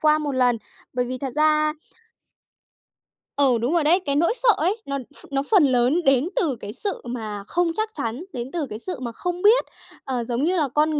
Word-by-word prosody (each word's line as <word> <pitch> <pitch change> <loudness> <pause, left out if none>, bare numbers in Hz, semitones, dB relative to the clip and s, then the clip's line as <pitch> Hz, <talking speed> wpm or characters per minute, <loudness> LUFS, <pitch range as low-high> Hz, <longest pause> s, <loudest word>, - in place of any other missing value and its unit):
qua 305 0 +4
một 295 -2 -2
lần. 250 -2 +2 0.3
Bởi 250 -1 0
vì 255 +1 -4
thật 265 -2 -4
ra 305 0 +3 1.7
Ừ, 265 -4 +4
đúng 250 +8 0
rồi 335 - +3
đấy, 340 +5 +4
cái 280 -1 0
nỗi 335 +7 +3
sợ 485 - +5
ấy, 385 +8 0
nó 275 0 -2
ph - - -14
nó 275 0 +1
phần 385 -7 +6
lớn 260 +6 +2
đến 270 +3 +4
từ 295 -7 +1
cái 210 -2 -8
sự 400 +10 -4
mà 215 -4 -5
không 350 -1 +1
chắc 435 0 0
chắn, 235 +8 -3
đến 245 +1 -5
từ 330 -4 -2
cái 215 - -6
sự 365 0 -6
mà 240 -2 -4
không 355 +8 -4
biết, 445 +4 +5 0.4
ờ, 250 -3 -2
giống 240 +3 -2
như 360 +3 +2
là 300 -3 +2
con 300 +2 +1
285 Hz, 220 wpm, -23 LUFS, 250-335 Hz, 1.7 s, phần